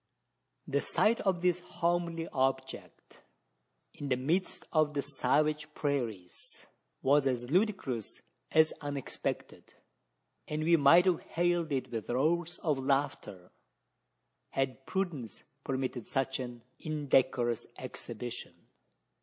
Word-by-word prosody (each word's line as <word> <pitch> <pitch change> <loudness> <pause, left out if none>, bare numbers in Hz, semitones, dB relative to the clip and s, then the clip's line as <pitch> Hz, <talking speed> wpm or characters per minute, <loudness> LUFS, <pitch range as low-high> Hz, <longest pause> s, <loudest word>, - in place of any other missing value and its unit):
The - - +1
sight 225 +2 +3
of 185 -3 0
this 180 -1 +3
homely 170 -1 -1
object, 130 0 -2 0.7
in 145 - -6
the 130 - +3
midst 165 +9 -1
of 155 -2 +3
the 140 - 0
savage 150 +2 +1
prairies, 115 - -3 0.4
was 140 +1 +4
as 125 -1 -1
ludicrous 180 - 0 0.3
as 160 0 +5
unexpected; 145 -2 -4 0.7
and 150 +1 -2
we 170 +1 +5
might 165 +4 +7
have 180 -3 +3
hailed 175 -1 0
it 135 -2 -1
with 115 -2 -4
roars 165 +7 +1
of 150 -5 +1
laughter, 135 -9 -1 1.0
had 135 0 -2
prudence 175 - -3 0.2
permitted 130 -3 -2
such 135 0 -1
an 120 -2 -6 0.2
indecorous 130 -6 +1
exhibition. - - -7
145 Hz, 110 wpm, -32 LUFS, 130-170 Hz, 1.0 s, might